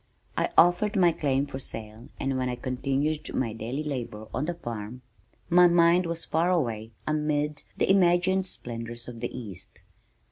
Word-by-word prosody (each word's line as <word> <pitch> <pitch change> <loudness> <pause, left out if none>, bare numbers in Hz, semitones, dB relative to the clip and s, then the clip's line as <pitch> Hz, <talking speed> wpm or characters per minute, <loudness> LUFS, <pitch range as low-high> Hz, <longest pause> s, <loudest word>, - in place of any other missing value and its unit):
I - - +1
offered 180 +5 +5
my 180 -3 +5
claim 140 -3 0
for 135 -2 -6
sale 110 -2 -8
and 135 0 -1
while 130 -1 0
I 125 - -2
continued 135 +5 -1
my 115 -4 0
daily 120 +7 -4
labor 120 -7 -5
on 130 - -1
the 175 +1 -2
farm, 120 -2 -6 0.4
my 180 +1 +7
mind 170 +1 +4
was 165 0 -2
far 165 +3 +1
away 115 -11 0 0.2
amid 150 -1 0 0.2
the - - +2
imagined 185 0 +3
splendors 120 -4 -7
of 120 -2 -8
the 120 - -3
east. 100 -7 -9
140 Hz, 165 wpm, -27 LUFS, 120-170 Hz, 0.4 s, my